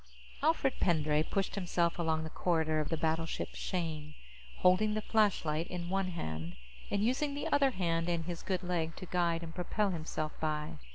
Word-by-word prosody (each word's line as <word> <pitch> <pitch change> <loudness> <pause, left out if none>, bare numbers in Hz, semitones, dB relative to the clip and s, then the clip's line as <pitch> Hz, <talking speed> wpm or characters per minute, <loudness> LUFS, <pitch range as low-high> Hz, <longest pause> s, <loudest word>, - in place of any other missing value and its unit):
_ - - -30 0.4
Alfred 290 -3 +2
Pendray 155 -3 +3
pushed 195 +5 -1
himself 175 -3 0
along 160 -1 +1
the 160 - -6
corridor 160 -3 +1
of 155 - -1
the 165 - 0
battleship 160 +1 -1
Shane, 155 -4 -3 0.5
holding 210 +4 +4
the 215 - 0
flashlight 170 -7 +2
in 175 -1 -4
one 195 -1 +1
hand 80 - -4 0.3
and 200 0 +1
using 280 +5 +1
the 290 - -3
other 280 -1 +4
hand 170 -6 0
and 170 -2 0
his 175 -1 -4
good 185 -1 -1
leg 165 -2 -1
to 185 - -7
guide 170 -2 +1
and 165 0 -7
propel 195 +3 0
himself 155 -2 -3
by. 150 - -2
170 Hz, 180 wpm, -33 LUFS, 160-190 Hz, 0.5 s, holding